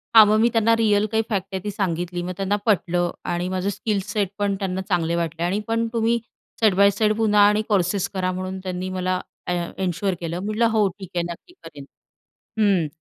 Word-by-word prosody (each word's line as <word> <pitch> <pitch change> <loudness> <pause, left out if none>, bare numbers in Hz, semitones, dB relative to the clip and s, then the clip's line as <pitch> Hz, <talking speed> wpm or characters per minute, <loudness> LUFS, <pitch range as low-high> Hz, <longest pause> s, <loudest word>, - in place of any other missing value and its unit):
हा 220 - +11
मग 215 +1 +3
मी 235 +2 +4
त्यांना 230 0 +4
रिअल 215 -2 +3
काही 220 0 +2
फॅक्ट 195 -4 -1
आहे 190 - -1
ती 210 - -3
सांगितली 175 -3 -2
मग 180 - -4
त्यांना 195 +1 0
पटलं 175 -4 +1 0.2
आणि 175 +1 -1
माझं 185 +1 -1
स्किल 205 0 -1
सेट 205 -2 -1
पण 200 -1 0
त्यांना 190 -1 -2
चांगले 170 -2 0
वाटले 165 0 -2
आणि 190 +4 0
पण 230 0 0
तुम्ही 230 +1 +2 0.4
साइड 215 -4 +4
बाय 200 +1 +6
साइड 215 +1 +1
पुन्हा 210 -2 +3
आणि 210 +1 +2
कोर्सेस 195 -1 +1
करा 185 -1 -1
म्हणून 185 +1 -4
त्यांनी 185 0 -4
मला 185 0 -1 0.3
अ, - - -1 0.3
एन्श्योर 190 +1 -1
केलं. 170 +1 -3
म्हटलं 215 +4 0
हो 215 -3 +3
ठीक 190 0 -11
आहे 170 - +1
नक्की 350 - -12
करेन. 140 -2 -10 0.7
हं 195 -7 +3
195 Hz, 205 wpm, -23 LUFS, 180-210 Hz, 0.7 s, हा